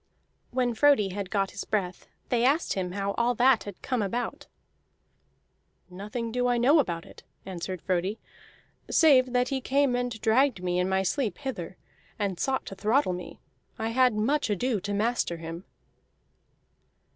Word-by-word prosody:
When 245 -1 0
Frodi 250 -5 +4
had 195 0 -5
got 195 -1 0
his - - -6
breath, 190 -4 -3 0.2
they 240 -1 +1
asked 285 +6 +2
him 180 -2 -3
how 200 0 -1
all 240 +1 +2
that 245 0 +4
had 205 -3 -9
come 255 -3 -1
about. 230 +4 -3 1.4
"Nothing 210 +5 -5
do 245 +1 0
I 245 -1 +2
know 275 +7 +5
about 170 - -1
it," - - -14 0.2
answered 185 -1 -5
Frodi, 185 +3 -1 0.7
"save 260 -6 +5
that 250 0 +2
he 270 -2 -2
came 275 -1 +2
and 245 -2 -2
dragged 225 -2 +2
me 180 0 0
in 180 +1 0
my 190 0 +1
sleep 215 - -1
hither, 190 -11 -6 0.4
and 200 -4 -2
sought 265 -1 -1
to - - -7
throttle 215 +1 +1
me. 180 -1 -8 0.4
I 225 - -2
had 250 -1 +3
much 265 +6 +1
ado 215 +2 0
to 205 +2 -5
master 210 -4 0
him." 165 +2 -7
220 Hz, 160 wpm, -27 LUFS, 190-255 Hz, 1.4 s, know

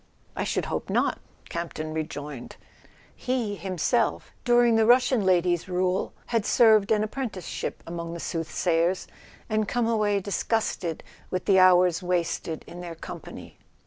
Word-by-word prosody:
"I - - -1
should - - -1
hope - - -4
not," - - +1 0.3
Campton 160 -2 -5
rejoined. 150 -5 -6 0.6
He 250 -5 -2
himself, 190 +6 -1
during 240 -1 +4
the 220 0 +3
Russian 250 -2 +4
lady's 175 0 +2
rule, 185 +1 0
had 230 -3 0
served 220 -2 +4
an 215 -1 +3
appren¬ 240 +2 -3
ticeship 185 -3 -5
among 170 0 -5
the - - -6
soothsayers, 165 +2 0 0.4
and 215 -1 0
come 240 +1 0
away 210 -3 +2
dis¬ 195 -2 -3
gusted 190 -7 -1 0.3
with 185 0 -3
the 190 -1 +5
hours 180 -1 +5
wasted 170 -3 -2
in 175 - -9
their 170 -1 -7
company. - - -10
185 Hz, 145 wpm, -26 LUFS, 170-220 Hz, 0.6 s, the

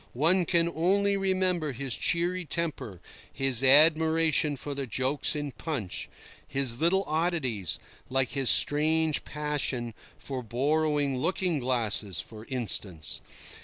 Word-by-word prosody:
One 170 +6 +3
can 170 0 +2
only 195 +5 +1
remember 185 -5 -1
his 130 -1 -3
cheery 175 +2 0
temper, 155 - -4 0.3
his 135 -3 0
admiration 155 +1 +4
for 145 +2 -6
the 140 -1 -5
jokes 130 +7 0
in 145 -1 -4
Punch, 130 - -4 0.4
his 135 -3 -2
little 190 +4 +2
oddities—like 135 - -2
his 135 -4 +2
strange 155 +5 +4
passion 145 -6 -3 0.2
for 130 -2 -5
borrowing 145 +3 0
looking 175 +1 -1
glasses, 110 - +1
for 110 +8 -8
instance. 100 - 0
145 Hz, 115 wpm, -27 LUFS, 125-165 Hz, 0.4 s, admiration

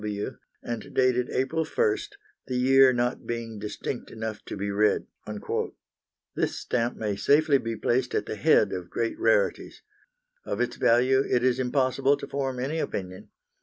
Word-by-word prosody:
D. 105 -1 -3
W.', 100 - -4 0.3
and 120 -1 -6
dated 125 -1 +2
April 160 +5 0
1st, 420 - 0 0.3
the 130 - -3
year 135 +1 +6
not 120 0 -1
being 115 -2 -4
distinct 105 +4 -5
enough 110 -1 -5
to - - -6
be 100 +1 -2
read." 105 +1 +2 1.3
This - - -1
stamp 120 0 -1
may 105 -2 -2
safely 145 +5 +4
be 115 -1 -3
placed 120 +3 0
at - - 0
the - - -4
head - - +3
of 90 -1 -5
great 115 +4 -2
rarities. - - +1 0.6
Of - - -4
its 120 - -1
value 130 +3 +4
it 125 - +2
is 130 0 +2
impossible 135 +2 +2
to - - -6
form 135 -2 -3
any 145 +6 -2
opinion. 95 -9 -5
125 Hz, 165 wpm, -27 LUFS, 110-135 Hz, 1.3 s, year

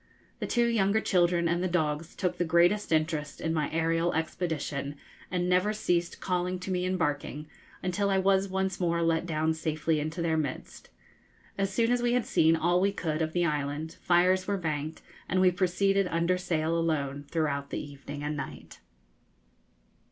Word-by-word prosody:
The - - -3
two 240 -1 +2
younger 220 -2 +2
children 175 -4 +2
and 170 +1 0
the 185 - +1
dogs 160 -2 -1
took 180 -1 -2
the - - +3
greatest 175 +5 +3
interest 155 -2 0
in 160 - -1
my 155 -3 0
aërial 165 +1 +1
expedition, 155 -4 -2 0.3
and 180 -1 -1
never 180 +4 +2
ceased 175 -5 -1
calling 180 0 -1
to 190 - -4
me 180 0 0
and 185 0 0
barking, 150 -1 -2 0.4
until 200 +3 0
I 195 - +2
was 195 0 +2
once 190 0 -1
more 170 -1 +1
let 165 +1 +1
down 160 0 +1
safely 160 0 -1
into 155 +3 -4
their 165 -1 +1
midst. 150 -4 -5 0.7
As 195 0 -1
soon 230 +4 +2
as 245 0 +2
we 240 0 +2
had 245 -2 +1
seen 160 +1 +4
all 175 +2 +2
we 200 +1 +3
could 160 -5 -2
of 160 0 -1
the 175 -1 +2
island, 150 +1 -2
fires 185 +1 +3
were 200 -1 0
banked, 155 -2 -3 0.3
and 185 - +2
we 185 -1 +5
proceeded 190 +2 +1
under 170 +1 +1
sail 165 -3 -1
alone 145 -4 -1
throughout 140 -3 -1
the - - -3
evening 145 0 -8
and 150 +1 -2
night. 140 -2 -8
170 Hz, 180 wpm, -29 LUFS, 155-185 Hz, 0.7 s, we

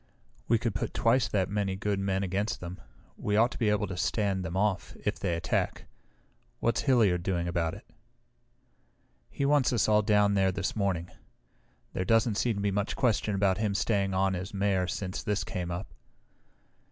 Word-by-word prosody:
"We 115 - +4
could 115 -1 -2
put 100 - -3
twice 115 0 +3
that 100 -3 0
many 100 -2 -1
good 100 0 -1
men 95 0 0
against 95 +1 -1
them. 90 +1 -8 0.4
We 105 - -1
ought 115 +4 +4
to - - -8
be 110 -4 +2
able 105 0 +1
to 95 -2 -5
stand 95 0 0
them 85 +2 -4
off, 95 -3 -1
if - - -1
they 85 - 0
attack. 85 - -1 0.7
What's 115 - +1
Hilliard 110 -10 +3
doing 85 -1 -1
about 85 0 -1
it?" 105 - -13 1.4
"He 140 - -2
wants 145 -2 +3
us 120 -4 +2
all 105 0 +4
down 105 -1 +3
there 95 -1 +3
this 95 0 -3
morning. 95 -5 -1 0.8
There 95 - -1
doesn't 115 +1 +2
seem 120 -3 +1
to 100 - -3
be 100 0 +1
much 100 +1 -1
question 110 -4 +1
about 95 -1 +2
him 105 -2 0
staying 100 -2 +1
on 95 0 +2
as 95 +2 -5
Mayor 95 -2 +1
since 90 +1 -4
this 105 -1 -1
came 90 -1 -4
up." 85 -3 -5
100 Hz, 185 wpm, -29 LUFS, 95-105 Hz, 1.4 s, We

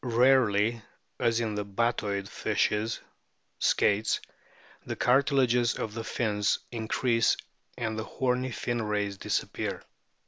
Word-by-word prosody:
Rarely, 120 -3 +3 0.4
as 115 0 +2
in 110 -2 -1
the 105 0 -2
Batoid 100 -1 -1
fishes 105 +2 0 0.6
(Skates), 105 +2 +2 0.6
the - - -4
cartilages 125 -2 +3
of 105 - -4
the 115 0 -4
fins 105 -3 0
increase 115 0 +1 0.4
and 110 -2 -2
the - - -2
horny 125 +2 -1
fin 120 0 -2
rays 105 -2 -1
disappear. - - -2
115 Hz, 110 wpm, -28 LUFS, 105-120 Hz, 0.6 s, Rarely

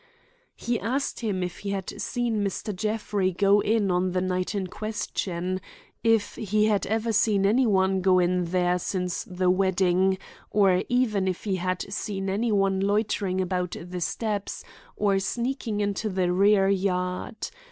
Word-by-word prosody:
He 235 -1 -2
asked 260 +6 -2
him 200 -6 -1
if 180 0 -5
he 200 - -5
had 200 +1 -4
seen 230 -2 -1
Mr. 200 +1 -3
Jeffrey 210 -2 -1
go 200 +3 +4
in 210 -2 +1
on 180 0 +1
the 185 - +1
night 185 +2 -1
in 195 -2 -1
question; 185 -3 -3 0.4
if 225 -2 +2
he 215 0 +1
had 210 -2 +1
ever 225 +2 0
seen 205 -2 +3
any 240 +5 +3
one 190 -2 +2
go 185 0 +4
in 180 0 +2
there 180 +1 +1
since 180 -1 -2
the 180 0 +1
wedding; 190 0 +2 0.3
or 195 -3 +3
even 225 -6 +1
if 185 -2 -2
he 195 -3 -1
had 185 0 -2
seen 195 -2 -3
any 220 +4 0
one 195 -2 +2
loitering 200 -2 0
about 180 -1 -1
the 180 +1 -6
steps, 210 +2 -2 0.3
or 200 -2 +2
sneaking 235 +1 -2
into 205 +1 -1
the 185 -2 0
rear 195 +1 +4
yard. 185 - -1
195 Hz, 160 wpm, -26 LUFS, 185-210 Hz, 0.4 s, go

